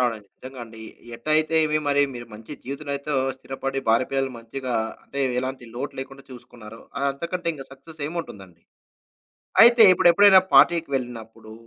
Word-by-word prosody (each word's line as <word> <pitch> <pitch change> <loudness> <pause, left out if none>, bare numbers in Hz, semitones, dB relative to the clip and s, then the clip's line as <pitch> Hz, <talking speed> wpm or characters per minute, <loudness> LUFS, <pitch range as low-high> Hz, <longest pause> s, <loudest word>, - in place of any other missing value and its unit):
అవునండి. 115 -4 -1
నిజంగా 130 0 -11
అండి. 115 -1 -14 0.4
ఎటైతే 155 +5 0
ఏమి 155 0 0
మరి 145 0 +3
మీరు 120 -1 -8
మంచి 110 +6 -11
జీవితంలోనైతో 140 +2 -5 0.2
స్థిరపడి 135 +1 -5
భార్య 115 +3 +3
పిల్లలు 135 -1 -1
మంచిగా 125 +2 -6 0.3
అంటే, 140 - -6 0.2
ఎలాంటి 130 0 -4
లోటు 135 +4 -5
లేకుండా 135 +1 -8
చూసుకున్నారో 115 -3 -13 0.3
అంతకంటే 170 +5 -6
ఇంక 135 - -9
సక్సెస్ 150 +4 -15
ఏముంటుందండి. 100 - -8 1.0
అయితే 235 0 +7
ఇప్పుడెప్పుడైనా 190 +3 +6
పార్టీకి 170 -3 +5
వెళ్ళినప్పుడు, 115 -3 -6
135 Hz, 135 wpm, -23 LUFS, 120-155 Hz, 1.0 s, అయితే